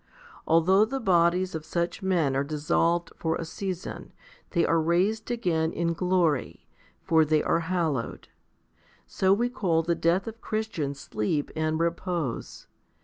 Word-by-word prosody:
Although 185 Hz, +6 st, +5 dB
the 270 Hz, +4 st, -3 dB
bodies 180 Hz, -3 st, +2 dB
of 160 Hz, -1 st, -4 dB
such 170 Hz, +4 st, -2 dB
men 170 Hz, -8 st, +1 dB
are 135 Hz, -, +1 dB
dissolved 165 Hz, +3 st, 0 dB
for 160 Hz, -1 st, -1 dB
a 165 Hz, -, -4 dB
season, 185 Hz, +1 st, -6 dB, 0.4 s
they 170 Hz, -3 st, +2 dB
are 165 Hz, -1 st, +2 dB
raised 190 Hz, +8 st, +1 dB
again 170 Hz, -9 st, 0 dB
in 170 Hz, 0 st, -1 dB
glory, 170 Hz, -5 st, 0 dB, 0.4 s
for 160 Hz, -1 st, +4 dB
they 155 Hz, 0 st, +2 dB
are 165 Hz, -, +2 dB
hallowed. 165 Hz, -7 st, -2 dB, 0.8 s
So 190 Hz, 0 st, +1 dB
we 230 Hz, +5 st, +3 dB
call 185 Hz, -10 st, 0 dB
the 170 Hz, +1 st, +1 dB
death 170 Hz, +3 st, +1 dB
of 225 Hz, 0 st, -8 dB
Christians 180 Hz, -11 st, -3 dB
sleep 125 Hz, +8 st, -2 dB
and 155 Hz, 0 st, 0 dB
repose. 170 Hz, -5 st, -3 dB
170 Hz, 145 wpm, -27 LUFS, 160-185 Hz, 0.8 s, Although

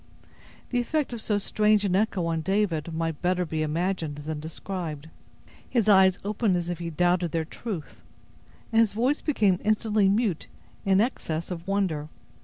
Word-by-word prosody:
The 245 Hz, -, +2 dB
effect 280 Hz, +2 st, -1 dB
of 230 Hz, -, -5 dB
so 210 Hz, -2 st, 0 dB
strange 210 Hz, +1 st, +2 dB
an 185 Hz, -2 st, +1 dB
echo 195 Hz, -3 st, +1 dB
on 165 Hz, -1 st, -1 dB
David 170 Hz, -3 st, 0 dB
may 165 Hz, 0 st, -1 dB
better 180 Hz, +3 st, 0 dB
be 160 Hz, -1 st, -2 dB
imagined 160 Hz, 0 st, -1 dB
than 155 Hz, -1 st, -3 dB
described. 160 Hz, -1 st, -6 dB, 0.6 s
His 235 Hz, -5 st, +1 dB
eyes 190 Hz, -2 st, +6 dB
opened 210 Hz, -1 st, +1 dB
as 175 Hz, 0 st, -3 dB
if 175 Hz, -, -3 dB
he 170 Hz, -1 st, -4 dB
doubted 175 Hz, +1 st, +1 dB
their 165 Hz, -1 st, 0 dB
truth; 160 Hz, -, -7 dB, 0.7 s
and 225 Hz, -, +3 dB
his 225 Hz, -3 st, +4 dB
voice 250 Hz, +7 st, +1 dB
became 205 Hz, -, +2 dB
instantly 215 Hz, -1 st, +2 dB
mute 205 Hz, -4 st, 0 dB, 0.4 s
in 195 Hz, +1 st, +5 dB
excess 170 Hz, -9 st, -2 dB
of 170 Hz, 0 st, -6 dB
wonder. 185 Hz, -7 st, 0 dB
185 Hz, 165 wpm, -26 LUFS, 165-210 Hz, 0.7 s, eyes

